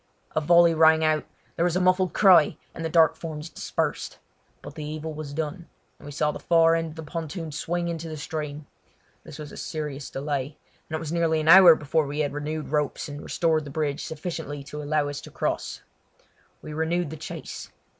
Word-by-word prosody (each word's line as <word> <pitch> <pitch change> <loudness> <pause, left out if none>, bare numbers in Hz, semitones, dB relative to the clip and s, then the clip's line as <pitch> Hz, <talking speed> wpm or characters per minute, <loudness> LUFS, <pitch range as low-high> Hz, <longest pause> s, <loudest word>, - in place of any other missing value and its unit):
A 155 - +2
volley 170 +1 +6
rang 160 0 +5
out. 155 -1 +1 0.3
There 170 - 0
was 175 -1 +1
a - - +2
muffled 185 0 +3
cry, 185 -7 +5 0.2
and 165 - -6
the 160 - -1
dark 160 -1 +5
forms 155 -1 -7
dispersed. - - -3 0.5
But - - -9
the 155 - -7
evil 155 +1 -5
was 150 -1 -7
done, 160 +3 -4 0.3
and - - -12
we - - -7
saw 150 +1 0
the - - -8
far 165 -1 +4
end 165 0 0
of 155 - -10
the 160 - -7
pontoon 165 +1 -5
swing 170 +3 -2
into 165 -1 -4
the 155 - -6
stream. 150 -1 -5 0.6
This - - -10
was 150 -2 -8
a - - -10
serious 150 -3 -5
delay, 140 0 -3 0.3
and 160 - -3
it - - -2
was 160 -1 -5
nearly 165 -2 +1
an 155 - -3
hour 175 -1 +10
before 150 0 0
we 145 +2 -2
had 145 -2 -1
renewed 150 +1 -4
ropes 150 -1 -1
and 145 0 -7
restored 160 -2 0
the 145 - -8
bridge 145 0 -2
sufficiently 155 -3 -5
to 150 +2 -7
allow 150 0 0
us 145 -1 -5
to - - -11
cross. - - -3 0.8
We 155 - -7
renewed 160 +1 -1
the - - -5
chase. 155 - -7
155 Hz, 205 wpm, -25 LUFS, 150-165 Hz, 0.8 s, hour